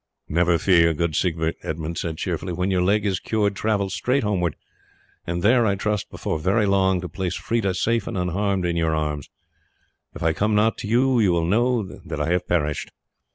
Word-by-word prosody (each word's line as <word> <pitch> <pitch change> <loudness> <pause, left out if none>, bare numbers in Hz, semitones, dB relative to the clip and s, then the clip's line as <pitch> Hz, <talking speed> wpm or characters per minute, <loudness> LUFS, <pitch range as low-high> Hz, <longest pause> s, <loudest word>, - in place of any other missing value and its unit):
"Never 85 +2 +2
fear, 85 -3 +4
good 85 -1 -1
Siegbert," 80 -1 0
Edmund 80 +1 -4
said 80 -1 -3
cheerfully; 90 +2 -3
"when 90 +3 -1
your 90 -1 +2
leg 100 +3 +2
is 95 -2 0
cured 105 -2 0
travel 100 -3 0
straight 125 +9 0
homeward, 90 -6 0 0.7
and 85 +1 -2
there, 120 +3 +5
I 100 - +2
trust, 105 0 -2
before 80 - -3
very 100 +6 +2
long 95 -2 +2
to 90 - -5
place 90 +2 -3
Freda 100 -5 -1
safe 115 +2 0
and 115 - -3
unharmed 95 +1 0
in 85 -1 0
your 80 -1 +1
arms. 75 -2 -3 0.9
If - - -6
I 80 0 +2
come 105 +6 0
not 110 +2 +2
you 120 +5 +2
will 90 -8 +2
know 120 +5 +2
that 95 - -8
I 80 - 0
have 90 0 0
perished." 75 -4 -1
95 Hz, 190 wpm, -23 LUFS, 85-105 Hz, 0.9 s, there